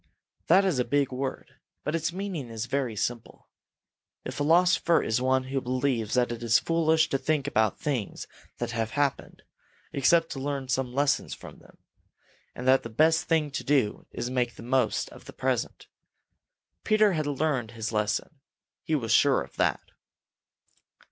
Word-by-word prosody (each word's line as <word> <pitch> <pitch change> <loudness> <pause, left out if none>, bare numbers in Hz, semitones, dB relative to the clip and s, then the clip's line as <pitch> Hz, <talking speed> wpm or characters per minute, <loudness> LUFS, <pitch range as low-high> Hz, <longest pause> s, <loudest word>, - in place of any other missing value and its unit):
That 190 +4 +5
is 175 -9 +1
a - - +3
big 140 0 0
word, 130 +1 -5 0.3
but 150 - -2
its 165 0 -1
meaning 180 -8 -5
is 115 0 -4
very 130 -3 -2
simple. 115 +2 -4 0.8
A - - -4
philosopher 170 +2 +3
is 110 +3 0
one 130 0 +2
who 135 +1 -2
believes 125 -3 -1
that 125 -1 +2
it 120 - -5
is 115 -2 +4
foolish 160 +4 +2
to 135 - 0
think 150 -2 0
about 110 -7 +1
things 130 -9 -3 0.3
that - - -3
have 115 -1 -2
happened, 145 -2 -1 0.5
except 165 +4 +3
to 135 - -5
learn 140 -1 -3
some 125 0 0
lesson 140 +2 +1
from - - -9
them, - - -20 0.8
and 125 - -5
that 130 +1 +5
the 115 - -7
best 160 +8 +3
thing 160 -3 +1
to - - -4
do 135 -7 +1
is - - -5
to 125 - -4
make 125 -2 -1
the - - -11
most 125 -1 +1
of - - -14
the - - -10
present. - - -2 1.0
Peter 215 -2 +4
had 155 -3 -1
learned 145 -5 -1
his 110 0 -3
lesson. 105 +7 -2 0.4
He 160 - -1
was 115 -6 -2
sure 140 +3 +4
of - - -16
that. - - +1
135 Hz, 170 wpm, -27 LUFS, 120-155 Hz, 1.0 s, That